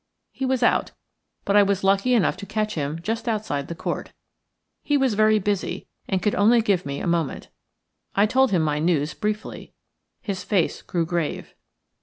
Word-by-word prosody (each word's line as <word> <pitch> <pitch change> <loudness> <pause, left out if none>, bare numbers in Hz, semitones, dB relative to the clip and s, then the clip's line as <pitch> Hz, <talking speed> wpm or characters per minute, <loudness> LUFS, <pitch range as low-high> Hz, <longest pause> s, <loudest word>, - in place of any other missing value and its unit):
He 265 - -3
was 260 -1 +1
out, - - +2 0.5
but 200 - +1
I 205 - +8
was 200 -1 +1
lucky 195 +6 +3
enough 220 - +2
to 200 - -8
catch 215 +1 -1
him 150 0 -3
just 225 +4 -3
outside 210 -11 -2
the 170 - -6
Court. - - -4 0.7
He 290 - +1
was 265 -4 +2
very 215 +1 +4
busy, 205 -1 -2 0.2
and 190 -2 -1
could 210 - +2
only 225 +4 +4
give 200 -8 +1
me 140 0 -3
a - - -4
moment. 170 -4 -1 0.7
I 200 - +5
told 265 +4 +3
him 175 -4 +2
my 150 -1 0
news 155 -2 +1
briefly. 215 0 -4 0.5
His 195 -3 -4
face 195 -4 0
grew 170 -2 -1
grave. 170 -2 -3
200 Hz, 180 wpm, -24 LUFS, 170-215 Hz, 0.7 s, I